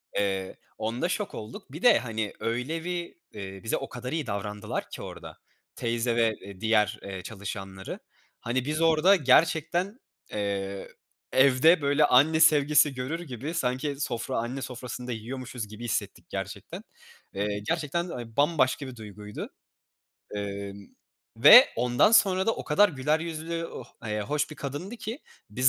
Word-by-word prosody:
Eee, 95 -2 -1 0.2
onda 115 +10 -2
şok 210 +1 -2
olduk. 110 +5 -9
Bir 155 - -8
de 245 -3 +6
hani 110 -4 -3
öyle 125 +8 -2
bir, 175 -1 -4 0.2
eee, 95 -2 -7
bize 110 - 0
o - - -6
kadar 125 +1 -6
iyi 160 -3 -2
davrandılar 105 0 -4
ki - - -8
orada - - -9 0.4
teyze 115 0 -1
ve, 115 -2 +3
eee, 95 -1 -11
diğer 110 -2 +2
eee 95 -2 -6
çalışanları 95 -2 -7 0.4
hani 125 +2 -2
biz 155 +3 -1
orada 165 +4 +5
gerçekten, 170 - +2 0.3
eee, 100 -1 -3 0.4
evde 140 +5 +5
böyle 145 +1 +4
anne 150 +5 +5
sevgisi 150 -2 +5
görür 130 +6 -3
gibi, 140 0 -6
sanki 140 -2 -1
sofra 130 -2 -2
anne 120 +4 -3
sofrasında 125 0 -6
yiyormuşuz 120 0 -5
gibi 110 +3 -10
hissettik 120 - -3
gerçekten. - - -6 0.5
Eee, 100 +1 -2
gerçekten, 170 +2 -1
aaa, 120 -3 -7
bambaşka 145 -2 +2
bir 130 - -8
duyguydu, 105 -1 -8 0.9
emm, 100 -1 -5 0.5
ve 220 - +10
ondan 125 - +3
sonra 190 -3 +5
da 225 - +3
o - - -7
kadar 205 +7 +5
güler 150 0 0
yüzlü 165 0 -4
oh - - -8 0.2
eee, 105 0 -2
hoş 145 +9 -1
bir 155 - -9
kadındı 145 - -5
ki 225 +5 -5 0.3
biz 125 +5 +3
130 Hz, 150 wpm, -27 LUFS, 110-160 Hz, 0.9 s, ve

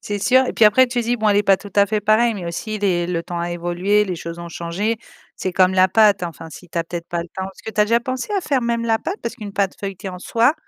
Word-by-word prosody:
C'est 205 0 -3
sûr 260 +5 +4
et - - -2
puis 225 - +4
après 255 +5 +6
tu 245 0 -1
dis: 240 +2 0
«Bon 215 -1 +1
elle 205 - +3
est 205 - +4
pas 195 -1 +5
tout 205 - -11
à 200 - +6
fait 210 +1 -1
pareille» 220 +3 +3
mais 185 - -6
aussi 215 +5 -4
les 175 -4 +1
le 175 -2 -2
temps 175 0 -5
a 170 0 -2
évolué, 175 +5 +1
les 180 -3 -4
choses 170 +1 -7
ont 170 - -7
changé. 180 +7 -2 0.4
C'est 185 - -3
comme 185 0 +4
la 185 0 +5
pâte, 205 -1 +4
enfin 165 -1 -7
si 180 +2 -12
tu 170 - -11
as - - +1
peut-être 170 0 -6
pas 170 -1 -2
le 170 - -12
temps. 190 - -5
Parce 190 0 -10
ce - - -14
que 220 - -5
tu 215 - 0
as - - +6
déjà 230 +2 +2
pensé 255 - -4
à 395 - +1
faire 270 -7 0
même 235 0 -1
la 225 -1 +2
pâte? 380 - -4
Parce 235 0 -4
qu'une 210 -4 -8
pâte 200 -2 -1
feuilletée 195 0 -6
en 180 -1 -7
soi, 235 - +2
205 Hz, 315 wpm, -20 LUFS, 175-230 Hz, 0.4 s, après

